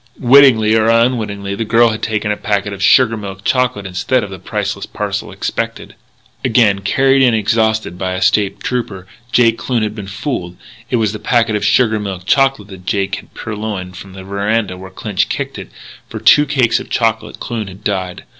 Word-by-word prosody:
Wittingly 125 Hz, -4 st, +5 dB
or 110 Hz, 0 st, +3 dB
unwittingly, 110 Hz, -4 st, +1 dB
the 100 Hz, -, -2 dB
girl 115 Hz, +2 st, +4 dB
had 110 Hz, -, -5 dB
taken 105 Hz, -1 st, -1 dB
a -, -, 0 dB
packet 100 Hz, -1 st, -2 dB
of 95 Hz, -, -8 dB
sugar 115 Hz, +2 st, +5 dB
milk 100 Hz, -2 st, -8 dB
chocolate 125 Hz, -5 st, 0 dB
instead 95 Hz, +7 st, 0 dB
of 100 Hz, -, -7 dB
the 95 Hz, -, -8 dB
priceless 90 Hz, -, -4 dB
parcel -, -, -4 dB
expected. -, -, -4 dB, 0.5 s
Again, 110 Hz, -5 st, +3 dB
carried 135 Hz, +7 st, +2 dB
in, 125 Hz, -3 st, +4 dB
exhausted, 110 Hz, -3 st, 0 dB
by 95 Hz, -1 st, -2 dB
a 95 Hz, -, -4 dB
State 105 Hz, -2 st, +1 dB
Trooper, 105 Hz, -7 st, -3 dB, 0.3 s
Jake 115 Hz, -2 st, +3 dB
Kloon 120 Hz, -4 st, -1 dB
had 105 Hz, -1 st, -2 dB
been 105 Hz, -3 st, -8 dB
fooled; 95 Hz, -, -4 dB
and -, -, -27 dB, 0.3 s
it -, -, 0 dB
was 110 Hz, -3 st, +1 dB
the 110 Hz, -, -6 dB
packet 115 Hz, -2 st, +1 dB
of 105 Hz, -, -2 dB
sugar 110 Hz, +1 st, +3 dB
milk 95 Hz, -3 st, -5 dB
chocolate 135 Hz, -4 st, +2 dB
that 95 Hz, -2 st, -12 dB
Jake 100 Hz, -1 st, -1 dB
had -, -, -14 dB
purloined 105 Hz, -4 st, -5 dB
from 95 Hz, +1 st, -11 dB
the 95 Hz, 0 st, -9 dB
veranda 100 Hz, 0 st, -1 dB
where 95 Hz, +1 st, -10 dB
Clinch 95 Hz, +1 st, -2 dB
kicked -, -, -4 dB
it. -, -, -9 dB, 0.4 s
For -, -, -6 dB
two 145 Hz, 0 st, +5 dB
cakes 130 Hz, -5 st, +2 dB
of -, -, -10 dB
chocolate 115 Hz, -2 st, -1 dB
Kloon 115 Hz, -4 st, -4 dB
had 95 Hz, +2 st, -12 dB
died. 95 Hz, -3 st, -3 dB
105 Hz, 195 wpm, -16 LUFS, 100-115 Hz, 0.5 s, Wittingly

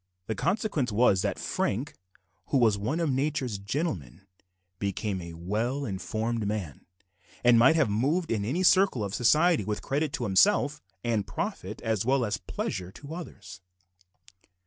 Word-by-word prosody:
The 110 Hz, -, -2 dB
consequence 155 Hz, -, 0 dB
was 105 Hz, -3 st, +4 dB
that -, -, -1 dB
Frank, 130 Hz, +9 st, -2 dB, 0.5 s
who 140 Hz, -, +2 dB
was 115 Hz, -5 st, +4 dB
one 110 Hz, +11 st, -2 dB
of 165 Hz, -4 st, +1 dB
nature's 130 Hz, -5 st, -1 dB
gentlemen, 100 Hz, -, -3 dB, 0.6 s
became 100 Hz, -1 st, -2 dB
a 85 Hz, -1 st, -8 dB
well 110 Hz, +11 st, -2 dB
informed 110 Hz, +2 st, -2 dB
man, 100 Hz, -11 st, -4 dB, 0.6 s
and 120 Hz, -1 st, +6 dB
might 135 Hz, +7 st, +6 dB
have 155 Hz, -5 st, +3 dB
moved 140 Hz, -, 0 dB
in 110 Hz, -3 st, 0 dB
any 145 Hz, -, -1 dB
circle 185 Hz, -, +4 dB
of 100 Hz, -1 st, -4 dB
society 155 Hz, -, +4 dB
with 105 Hz, +1 st, -3 dB
credit 145 Hz, +2 st, -1 dB
to -, -, -2 dB
himself, 105 Hz, +8 st, +3 dB, 0.2 s
and 110 Hz, -4 st, 0 dB
profit -, -, -4 dB
as 110 Hz, -2 st, 0 dB
well 130 Hz, +1 st, +2 dB
as 105 Hz, -, -1 dB
pleasure 90 Hz, -1 st, -4 dB
to 145 Hz, +7 st, -9 dB
others. 100 Hz, -, -9 dB
115 Hz, 150 wpm, -28 LUFS, 100-145 Hz, 0.6 s, and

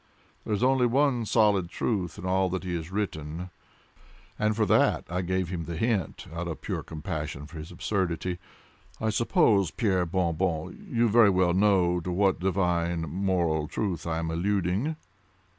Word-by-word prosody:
There 110 Hz, -, -1 dB
is 105 Hz, -, -2 dB
only 130 Hz, -1 st, +4 dB
one 130 Hz, -1 st, +2 dB
solid 100 Hz, -6 st, +3 dB
truth 90 Hz, -6 st, -2 dB
in -, -, -7 dB
all 95 Hz, 0 st, +2 dB
that 95 Hz, +1 st, -3 dB
he 90 Hz, -1 st, -3 dB
has 80 Hz, -1 st, -5 dB
written, 90 Hz, -3 st, -4 dB, 0.9 s
and 105 Hz, 0 st, +1 dB
for 110 Hz, 0 st, +2 dB
that -, -, +3 dB
I 90 Hz, +1 st, 0 dB
gave 95 Hz, -1 st, -1 dB
him 85 Hz, -3 st, -4 dB
the 85 Hz, 0 st, -5 dB
hint 110 Hz, -4 st, -1 dB
out 85 Hz, +1 st, -4 dB
of 80 Hz, -, -5 dB
pure -, -, -3 dB
compassion 75 Hz, -1 st, -5 dB
for 80 Hz, +2 st, -10 dB
his 75 Hz, +3 st, -8 dB
absurdity. 90 Hz, -1 st, -2 dB, 0.6 s
I 110 Hz, 0 st, 0 dB
suppose, 110 Hz, -, +3 dB
Pierre 95 Hz, -1 st, 0 dB
Bon 85 Hz, -1 st, 0 dB
Bon, 80 Hz, -2 st, -1 dB
you 115 Hz, 0 st, +2 dB
very 110 Hz, -1 st, +6 dB
well 90 Hz, -2 st, +3 dB
know 95 Hz, -3 st, +3 dB
to 90 Hz, +1 st, -4 dB
what 95 Hz, +1 st, +2 dB
divine 90 Hz, -2 st, 0 dB
moral 85 Hz, -2 st, 0 dB
truth 90 Hz, -4 st, -3 dB
I 80 Hz, -1 st, -1 dB
am 80 Hz, 0 st, -2 dB
alluding?" 100 Hz, -, 0 dB
90 Hz, 170 wpm, -27 LUFS, 85-105 Hz, 0.9 s, very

